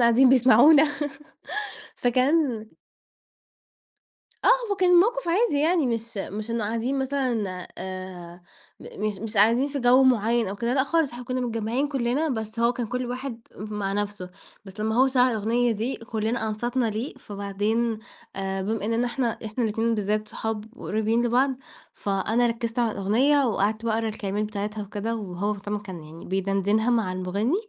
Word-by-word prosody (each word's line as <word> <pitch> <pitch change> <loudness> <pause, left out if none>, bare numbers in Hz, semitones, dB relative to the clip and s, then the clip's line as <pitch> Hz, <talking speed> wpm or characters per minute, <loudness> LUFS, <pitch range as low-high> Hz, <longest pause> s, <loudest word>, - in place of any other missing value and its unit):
قاعدين 235 +2 +6
بيسمعونا 260 +4 +7 1.1
فكان 255 -1 +1 1.8
آه - - +5 0.2
هو 405 - +1
كان 370 -2 +3
الموقف 455 +6 +4
عادي 370 -2 +2
يعني، 320 -2 +2
مش 230 -1 -3
مش 210 +3 -5
إنّه 230 -2 -1
قاعدين 230 +5 -1
مثلًا 240 -9 -1
آآ، 185 -2 -7 0.4
م 210 - -7
مش 205 -3 -2
مش 220 0 -6
قاعدين 230 +7 +4
في 285 - -3
جو 245 +2 +6
معيّن 235 -2 +3
أو 200 - -5
كده 235 +3 -1
لأ، 265 - +3
خالص، 320 -1 +1
إحنا 245 +1 -8
كنّا 255 0 -2
متجمعين 235 +3 -1
كلنا 270 +3 0
بس 220 -3 -4
هو 235 +1 +4
كان 240 -2 -3
كل 250 +2 -3
واحد 250 -1 -5 0.2
ام - - -7
مع 195 -1 -1
نفسه، 205 -3 -3 0.3
بس 195 +1 -10
لمّا 220 +1 0
هو 260 +3 +5
شغل 260 -1 +3
الأغنية 230 +2 +1
دي، 225 +5 -2
كلنا 225 0 -2
أنصتنا 240 +3 -1
ليه 220 +6 -3
فبعدين 210 +3 -2 0.4
آآ، 195 0 -2
بما 215 +1 -2
إننا 230 +3 +1
إحنا 240 -2 -1
إحنا 220 +3 -2
الاتنين 225 +1 0
بالذات، 210 0 -1
صحاب 220 -1 -4
وقريبين 220 +2 0
لبعض، 255 +4 +3 0.4
فأنا 210 +4 0
ركزت 230 0 -3
على 235 -2 +2
الأغنية 260 +9 +3
وقعدت 215 0 0
باقرا 225 0 0
الكلمات 210 -1 -2
بتاعتها 210 0 -4
وكده، 205 +3 -3
وهو 200 0 -3
مهتم 205 0 -5
وكان 190 -5 -6
يعني 160 +2 -12
بيدندنها 195 +4 +1
مع 225 -6 +1
المغني، 195 - -1
225 Hz, 160 wpm, -25 LUFS, 205-250 Hz, 1.8 s, بيسمعونا